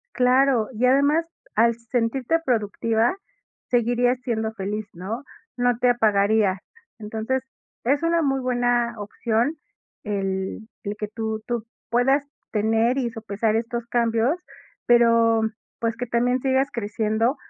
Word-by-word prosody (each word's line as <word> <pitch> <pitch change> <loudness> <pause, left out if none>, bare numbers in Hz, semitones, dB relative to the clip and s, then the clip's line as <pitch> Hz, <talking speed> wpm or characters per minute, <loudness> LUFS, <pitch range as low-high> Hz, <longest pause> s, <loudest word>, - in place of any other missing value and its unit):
Claro. 250 -2 +3
Y 240 +4 +1
además 285 +5 +4 0.3
al 230 +2 +4
sentirte 240 +5 0
productiva 230 - +1 0.5
seguirías 245 +1 +2
siendo 220 -2 -2
feliz, 210 0 -4
¿no? 210 - -5 0.3
No 245 -1 +2
te 250 - +4
apagaría. 210 -4 +3 0.4
Entonces, 220 +5 -2 0.4
es 280 +5 +2
una 335 0 +2
muy 270 -2 +1
buena 245 -2 +1
opción 225 +6 -1 0.5
el 195 0 -3 0.2
el 205 0 -3
que 210 - -3
tú 220 0 -4
tú 235 -2 -2 0.2
puedas 270 +4 +3 0.3
tener 225 +4 +2
y 245 -3 0
sopesar 215 -1 -1
estos 235 +1 -2
cambios, 235 +6 +1 0.5
pero, 230 -1 +5 0.4
pues, 230 -1 -1
que 245 - -3
también 245 +2 +1
sigas 265 +1 +1
creciendo. 220 +3 0
235 Hz, 125 wpm, -24 LUFS, 220-250 Hz, 0.5 s, pero